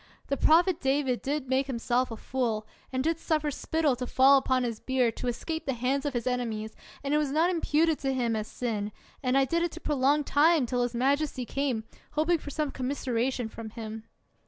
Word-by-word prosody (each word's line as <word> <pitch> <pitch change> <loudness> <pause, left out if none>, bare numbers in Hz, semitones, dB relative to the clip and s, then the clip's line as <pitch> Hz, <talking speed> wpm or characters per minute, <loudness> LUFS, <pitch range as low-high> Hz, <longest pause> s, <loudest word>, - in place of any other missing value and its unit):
The 280 - +2
prophet 335 +5 +4
David 270 -2 +1
did 280 -1 -2
make 265 +1 +1
himself 250 0 0
a 225 - -6
fool, 230 -4 -2 0.3
and 260 0 -1
did 325 +2 0
suffer 305 -2 0
spittle 310 -1 0
to 250 0 -4
fall 270 +2 +6
upon 260 -1 +1
his 230 -3 -3
beard, 255 -4 +1
to 250 - -4
escape 320 +7 -3
the 270 - 0
hands 265 +4 0
of 280 - -3
his 235 - -1
enemies, 230 -4 -2 0.3
and 280 +1 -1
it 300 - +4
was 300 -2 0
not 320 +6 +2
imputed 325 -2 +2
to 270 -1 -1
him 240 -3 0
as 215 0 -3
sin, 215 -4 -3 0.3
and 255 -1 +2
I 270 - +4
did 335 +5 0
it 345 - +1
to 335 - -7
prolong 290 -1 +2
time 295 +1 +4
till 245 +1 -1
his 245 0 -1
majesty 275 +1 +1
came, 260 -4 -1 0.3
hoping 315 +3 +2
for 295 - -8
some 300 0 -2
commiseration 255 -2 -1
from 220 0 -8
him. 220 0 -7
265 Hz, 205 wpm, -28 LUFS, 245-295 Hz, 0.3 s, fall